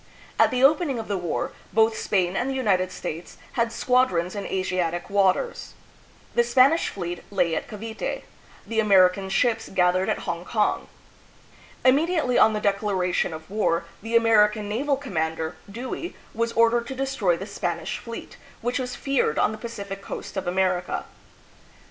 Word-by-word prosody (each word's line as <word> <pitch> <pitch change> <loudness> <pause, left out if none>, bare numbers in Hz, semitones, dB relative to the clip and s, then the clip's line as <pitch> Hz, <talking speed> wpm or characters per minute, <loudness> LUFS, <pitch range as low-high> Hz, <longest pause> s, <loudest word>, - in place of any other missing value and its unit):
At - - +6
the 255 0 0
opening 290 -1 +4
of 225 - -5
the 205 - -1
war, 175 -3 -2 0.2
both 220 0 +3
Spain 185 -4 0
and 245 +6 0
the 270 - -2
United 185 -8 +1
States 165 -1 -6
had 235 -1 0
squadrons 235 -8 +1
in 205 -1 -4
Asiatic 185 -1 -2
waters. 200 - +1 0.6
The 240 - +4
Spanish 260 +7 +4
fleet 175 -2 -5
lay 180 -5 +1
at - - -3
Cavite, 220 +1 -5 0.4
the 225 -1 -1
American 190 -2 +4
ships 225 +3 +1
gathered 185 0 +2
at - - -2
Hong 170 0 -3
kong. 210 +3 0 1.0
Immediately 295 0 +3
on 220 - +6
the 210 - -1
declaration 200 -4 0
of 160 0 -8
war, 190 -5 0 0.2
the 225 +2 -3
Amer 225 -2 +6
ican 210 0 -6
naval 270 +7 0
commander, 160 - -3 0.2
Dewey, 255 - -5 0.2
was 230 +1 -1
ordered 230 +1 +3
to 265 - -5
destroy 260 -10 0
the 190 - -6
Spanish 175 -4 -3
fleet, 230 -1 -8 0.2
which 245 +3 -1
was 250 -1 -4
feared 275 - 0
on - - +3
the 215 - -6
Pacific 200 -4 -6
coast - - -7
of 190 -2 -3
America. 180 0 0
210 Hz, 160 wpm, -25 LUFS, 185-240 Hz, 1.0 s, At